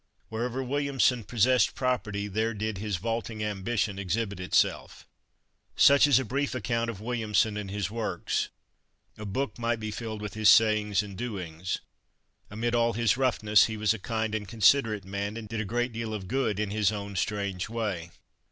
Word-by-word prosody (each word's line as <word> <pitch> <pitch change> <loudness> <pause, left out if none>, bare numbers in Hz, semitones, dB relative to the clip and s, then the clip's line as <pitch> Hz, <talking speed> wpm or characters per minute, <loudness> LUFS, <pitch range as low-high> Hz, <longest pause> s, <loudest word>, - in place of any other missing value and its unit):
Wherever 120 +4 -2
Williamson 135 -2 +1
possessed 120 +1 +3
property 105 -5 -1
there 110 +3 -1
did 105 -1 -3
his 105 -1 -2
"vaulting 115 +2 -3
ambition" 105 0 -1
exhibit 100 +1 -2
itself. 90 - 0 0.7
Such 140 +1 +7
is 145 - +5
a 130 - 0
brief 140 +4 -1
account 115 -1 -1
of 105 -3 -6
Williamson 110 -2 0
and 105 -2 -4
his 100 -1 -3
works. 115 -1 -2 0.7
A 105 - -5
book 130 +6 -3
might 120 -1 0
be 110 0 -4
filled 110 -1 -5
with 105 -2 -5
his 110 -1 +4
sayings 105 -3 +4
and 100 -2 -9
doings. 95 -7 -4 0.7
Amid 115 +3 -2
all 115 0 +2
his 115 -1 +2
roughness 110 -5 +4
he 110 -1 -4
was 105 +1 +2
a 115 - -6
kind 110 +1 -2
and 105 -2 -3
considerate 110 -1 +3
man, 100 +3 -4
and 110 -2 -7
did 110 +1 -3
a - - -3
great 120 +3 -1
deal 110 -1 -3
of 95 -3 -6
good 115 -5 0
in 105 -2 -1
his 105 -1 +2
own 100 -1 -5
strange 100 -1 -2
way. 105 -7 -3
110 Hz, 175 wpm, -28 LUFS, 100-115 Hz, 0.7 s, Such